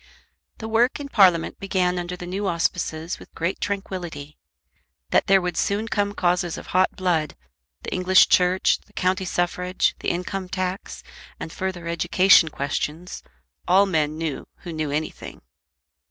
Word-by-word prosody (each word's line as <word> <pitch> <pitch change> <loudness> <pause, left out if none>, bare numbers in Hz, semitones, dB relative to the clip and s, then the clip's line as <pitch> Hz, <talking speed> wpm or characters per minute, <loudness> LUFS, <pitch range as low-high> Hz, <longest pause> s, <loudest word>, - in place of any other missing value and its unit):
The 220 - -6
work 235 +5 +2
in 285 -1 -6
Parliament 185 -9 +3
began 180 -2 0
under 175 +1 -4
the 175 - -7
new 195 +3 -3
auspices 170 -1 -2
with - - -15
great 170 +3 -2
tranquillity. 180 -7 -5 0.7
That - - +3
there 195 0 +6
would 180 -1 -3
soon 205 +3 0
come 205 -2 -1
causes 175 -2 0
of - - -9
hot 185 +1 +1
blood, 170 -5 0 0.5
the - - -4
English 185 0 +5
Church, 180 +1 +3
the - - -28
county 185 +1 0
suffrage, 180 +1 0
the - - -2
income 180 +1 -3
tax, 185 +1 -4 0.4
and 160 - -6
further 185 -3 -4
education 175 0 +4
questions, 150 +4 -4 0.5
all 190 +3 +5
men 155 -5 0
knew 160 -3 -4 0.2
who 175 - -6
knew 155 -2 -2
anything. 150 +2 -5
180 Hz, 150 wpm, -23 LUFS, 170-190 Hz, 0.7 s, there